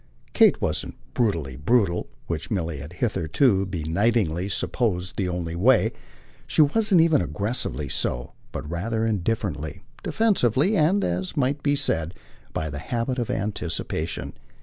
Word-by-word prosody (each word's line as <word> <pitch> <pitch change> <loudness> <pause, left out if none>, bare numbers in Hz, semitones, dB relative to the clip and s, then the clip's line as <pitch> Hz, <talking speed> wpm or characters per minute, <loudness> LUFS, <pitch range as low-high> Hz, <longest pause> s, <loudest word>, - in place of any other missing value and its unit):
Kate - - +5
wasn't - - -2 0.2
brutally 85 - 0
brutal 90 - +1 0.2
which 85 -2 -4
Milly 85 -7 -1
had 75 +5 -8
hitherto 100 - +1
benightedly 90 +2 0
supposed 95 -3 -1
the 95 -3 -1
only 85 -2 -3
way; 115 +8 +4 0.6
she 155 - +5
wasn't 190 +3 +4
even 160 - +4
aggressively 85 - -2
so, - - -2 0.2
but - - -5
rather 110 +8 -1
indifferently, 100 -7 -2 0.2
defensively 190 - +2
and, 190 +4 +3
as 90 - -2
might 140 +1 +1
be 145 0 +2
said, 85 - -1 0.4
by 80 - -2
the 75 -1 -5
habit 120 - -2
of 120 - -2
anticipation. 85 -5 -2
100 Hz, 130 wpm, -25 LUFS, 85-125 Hz, 0.6 s, Kate